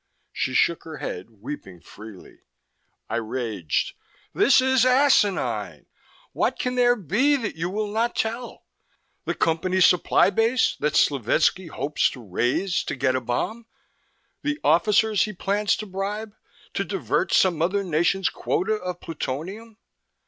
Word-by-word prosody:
She 130 Hz, -, -2 dB
shook 170 Hz, -, +2 dB
her 160 Hz, -2 st, -8 dB
head, 90 Hz, +5 st, -6 dB
weeping 110 Hz, -4 st, -9 dB
freely. 105 Hz, +1 st, -13 dB, 0.7 s
I -, -, -2 dB
raged: 110 Hz, -, -2 dB, 0.4 s
"This 275 Hz, -, +5 dB
is 260 Hz, -1 st, +3 dB
asinine! 255 Hz, -6 st, +2 dB, 0.5 s
What -, -, 0 dB
can 250 Hz, -, -2 dB
there 245 Hz, -1 st, +4 dB
be 235 Hz, -, +2 dB
that 230 Hz, -7 st, -3 dB
you 165 Hz, +2 st, -3 dB
will 210 Hz, +3 st, -2 dB
not 230 Hz, +3 st, 0 dB
tell? 230 Hz, +2 st, -4 dB, 0.6 s
The -, -, -2 dB
Company 175 Hz, +3 st, 0 dB
supply 180 Hz, +1 st, +4 dB
base 225 Hz, +5 st, +2 dB
that 150 Hz, 0 st, -1 dB
Slovetski 150 Hz, -, +2 dB
hopes 150 Hz, -2 st, 0 dB
to 130 Hz, -, -10 dB
raid 120 Hz, -, 0 dB, 0.2 s
to -, -, -2 dB
get 130 Hz, 0 st, +1 dB
a 130 Hz, -, 0 dB
bomb? 220 Hz, -, -3 dB, 0.7 s
The 295 Hz, 0 st, -2 dB
officers 210 Hz, +6 st, +3 dB
he 215 Hz, -, -6 dB
plans 200 Hz, +2 st, 0 dB
to 215 Hz, -, -6 dB
bribe, 205 Hz, +2 st, -4 dB, 0.4 s
to -, -, -1 dB
divert -, -, -1 dB
some 175 Hz, -4 st, +3 dB
other 195 Hz, +4 st, +1 dB
nation's 175 Hz, +2 st, +1 dB
quota 195 Hz, +5 st, -1 dB
of 180 Hz, -3 st, -6 dB
plutonium?" 185 Hz, -, -6 dB
185 Hz, 140 wpm, -24 LUFS, 150-220 Hz, 0.7 s, This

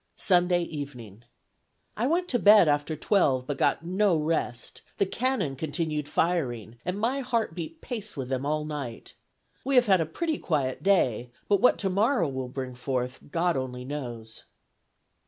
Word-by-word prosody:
Sunday 180 Hz, -1 st, +3 dB
evening. 125 Hz, -, -8 dB, 0.7 s
"I 235 Hz, +4 st, 0 dB
went 350 Hz, +4 st, +1 dB
to 245 Hz, -, +1 dB
bed 210 Hz, -5 st, +7 dB
after 145 Hz, +1 st, +1 dB
twelve, 140 Hz, -7 st, +2 dB
but 145 Hz, -1 st, -4 dB
got 165 Hz, -, +1 dB
no 190 Hz, +1 st, +2 dB
rest; 150 Hz, -6 st, -2 dB, 0.2 s
the 200 Hz, -, +3 dB
cannon 205 Hz, -, -1 dB
continued 150 Hz, 0 st, -2 dB
firing, 120 Hz, -, -1 dB
and 180 Hz, +3 st, -3 dB
my 245 Hz, +6 st, 0 dB
heart 235 Hz, -8 st, -1 dB
beat 175 Hz, -, -7 dB
pace 215 Hz, -, -5 dB
with 130 Hz, -2 st, -3 dB
them 130 Hz, 0 st, -2 dB
all 150 Hz, +1 st, -1 dB
night. 140 Hz, -6 st, -6 dB, 0.5 s
We 275 Hz, +1 st, 0 dB
have 250 Hz, -1 st, +6 dB
had 190 Hz, -5 st, +4 dB
a 160 Hz, -, -1 dB
pretty 315 Hz, -, -2 dB
quiet 140 Hz, -6 st, -1 dB
day, 130 Hz, -, +2 dB, 0.2 s
but 200 Hz, -1 st, +3 dB
what 250 Hz, -, +5 dB
tomorrow 200 Hz, -, +1 dB
will 130 Hz, -2 st, -4 dB
bring 130 Hz, 0 st, -5 dB
forth, 125 Hz, +1 st, -4 dB
God 170 Hz, +3 st, +1 dB
only 125 Hz, -1 st, -4 dB
knows." 120 Hz, -6 st, -7 dB
155 Hz, 160 wpm, -27 LUFS, 130-200 Hz, 0.7 s, bed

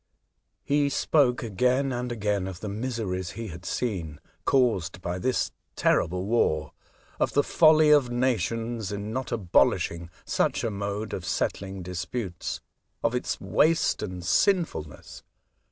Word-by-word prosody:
He 145 Hz, 0 st, +2 dB
spoke 135 Hz, -3 st, +2 dB
again 125 Hz, +6 st, +1 dB
and 125 Hz, 0 st, -3 dB
again 105 Hz, -4 st, -1 dB
of 95 Hz, -2 st, -7 dB
the 105 Hz, -, -4 dB
miseries 100 Hz, -5 st, -3 dB
he 115 Hz, -2 st, -5 dB
had 85 Hz, +2 st, -10 dB
seen, 85 Hz, -11 st, -3 dB, 0.3 s
caused 110 Hz, -10 st, +2 dB
by 90 Hz, 0 st, -3 dB
this 130 Hz, +7 st, 0 dB, 0.2 s
terrible 90 Hz, +2 st, +1 dB
war; 115 Hz, +3 st, +1 dB, 0.5 s
of -, -, +1 dB
the 145 Hz, -, +4 dB
folly 155 Hz, -1 st, +5 dB
of 145 Hz, -4 st, +5 dB
nations 115 Hz, -3 st, -1 dB
in 105 Hz, +2 st, -4 dB
not 130 Hz, 0 st, -3 dB
abolishing 85 Hz, -4 st, +1 dB, 0.2 s
such -, -, 0 dB
a 115 Hz, -, 0 dB
mode 100 Hz, +1 st, -4 dB
of 90 Hz, -, -4 dB
settling 95 Hz, +2 st, -2 dB
disputes; 90 Hz, +2 st, -4 dB, 0.4 s
of -, -, +2 dB
its -, -, -2 dB
waste 165 Hz, +2 st, +2 dB
and 90 Hz, -3 st, -5 dB
sinfulness. 165 Hz, -, 0 dB
110 Hz, 135 wpm, -27 LUFS, 90-125 Hz, 0.5 s, folly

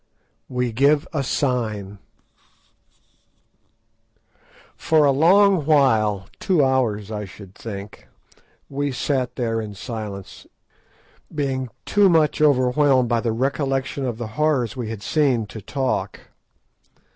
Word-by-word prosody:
WE 125 Hz, -1 st, -1 dB
GIVE 145 Hz, +7 st, +2 dB
A 145 Hz, -, 0 dB
SIGN 110 Hz, -7 st, -2 dB, 2.8 s
For 155 Hz, -2 st, +3 dB
a 140 Hz, -, +5 dB
long 185 Hz, +5 st, +4 dB
while—two 135 Hz, -, +2 dB
hours, 110 Hz, -6 st, 0 dB
I 105 Hz, -1 st, -4 dB
should 95 Hz, 0 st, -13 dB
think—we 115 Hz, +7 st, -8 dB
sat 130 Hz, -1 st, -1 dB
there 115 Hz, -3 st, -1 dB
in 105 Hz, -2 st, -7 dB
silence, 105 Hz, -3 st, -7 dB, 0.9 s
being 135 Hz, -3 st, -2 dB, 0.2 s
too 205 Hz, -2 st, +4 dB
much 160 Hz, -3 st, +2 dB
overwhelmed 130 Hz, -2 st, +3 dB
by 120 Hz, -1 st, +2 dB
the 115 Hz, -, -1 dB
recollection 135 Hz, +2 st, -1 dB
of 120 Hz, -4 st, -3 dB
the 115 Hz, -2 st, -5 dB
horrors 140 Hz, -6 st, +1 dB
we 120 Hz, -4 st, -4 dB
had 110 Hz, -3 st, -6 dB
seen 135 Hz, -8 st, +1 dB
to 105 Hz, +1 st, -10 dB
talk. 130 Hz, +5 st, -2 dB
130 Hz, 110 wpm, -22 LUFS, 110-145 Hz, 2.8 s, a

